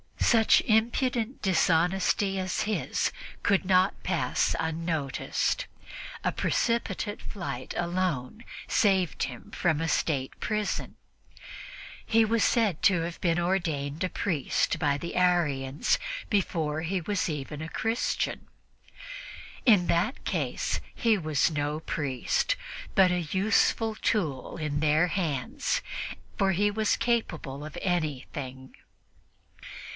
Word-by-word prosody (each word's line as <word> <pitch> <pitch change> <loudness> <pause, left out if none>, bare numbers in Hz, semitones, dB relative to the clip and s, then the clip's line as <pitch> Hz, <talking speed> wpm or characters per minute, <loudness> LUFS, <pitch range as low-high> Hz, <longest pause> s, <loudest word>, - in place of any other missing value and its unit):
Such 225 -3 +5
impudent 235 +2 +1
dishonesty 190 +2 +2
as 185 -1 -1
his 215 0 0 0.3
could 195 -2 +2
not 185 +1 +3
pass - - 0
unnoticed; 160 - -1 0.6
a - - +1
precipitate 225 -3 -1
flight 150 -10 -5
alone 175 - -2 0.2
saved 190 -6 +2
him 125 -3 -6
from 160 -4 +1
a 165 - 0
State 140 -4 -1
prison. 215 -2 -2 1.1
He 225 0 +4
was 225 +1 +2
said 215 - +2
to 180 -4 +5
have 170 +1 -4
been 170 -2 +2
ordained 165 -4 -1
a - - -2
priest 165 -9 0
by 145 -2 +2
the 170 +4 -6
Arians 150 -7 +2 0.3
before 160 -6 0
he 180 +3 -1
was 200 +3 -1
even 150 0 -5
a 160 - -5
Christian. 225 +6 -1 1.2
In 205 -7 +6
that 175 +10 0
case - - -1 0.2
he 225 -2 +3
was 155 -3 +1
no 150 +1 -2
priest, 135 -6 0 0.4
but 190 -2 +6
a 180 - +1
useful 210 +6 +2
tool 160 - -1
in 150 -2 -2
their 155 +3 +3
hands, 155 -10 -1 0.6
for 195 -1 +3
he 205 +3 +2
was 215 0 +1
capable 160 - -1
of 155 - -8
anything. 140 -6 -3
175 Hz, 115 wpm, -28 LUFS, 150-205 Hz, 1.2 s, In